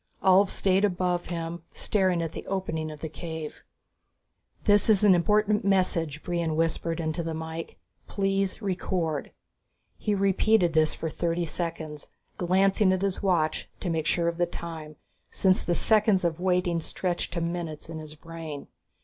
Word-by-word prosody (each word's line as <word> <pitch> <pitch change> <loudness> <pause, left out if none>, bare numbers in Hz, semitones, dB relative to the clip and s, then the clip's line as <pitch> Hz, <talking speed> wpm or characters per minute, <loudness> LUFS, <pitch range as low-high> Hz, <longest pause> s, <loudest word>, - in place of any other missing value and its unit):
Ulv 190 +1 +6
stayed 190 +1 +2
above 180 -2 +1
him, 170 -1 -4
staring 185 -4 +1
at 165 - -3
the - - -8
opening 165 -5 -2
of 150 -1 -9
the 160 - -3
cave. 160 -1 -7 1.0
"This 205 +1 +4
is 210 -2 +5
an 205 -3 +7
important 210 +4 +2
message," 170 -6 +1
Brion 170 -3 -1
whispered 165 +1 0
into 160 +1 -2
the 165 -1 -3
mike. 160 +1 -6 0.3
"Please 195 +1 -1
record." 175 -5 -1 0.7
He 210 -2 0
repeated 195 -2 +3
this 155 -1 +3
for 160 - -4
thirty 170 +1 -1
seconds, 160 -3 -4 0.3
glancing 190 +2 +3
at 185 +1 0
his 195 -2 -1
watch 170 -5 +1
to 180 - -2
make 160 -1 -1
sure 170 -1 +1
of 170 0 -1
the 175 - +3
time, 160 -3 -7 0.3
since 185 -1 +2
the 175 - 0
seconds 210 -3 +3
of 165 -1 0
waiting 180 -2 +1
stretched 175 +1 -2
to 170 - -1
minutes 170 -2 -4
in 160 -1 -6
his 155 -1 -9
brain. 160 -2 -8
175 Hz, 160 wpm, -27 LUFS, 160-190 Hz, 1.0 s, an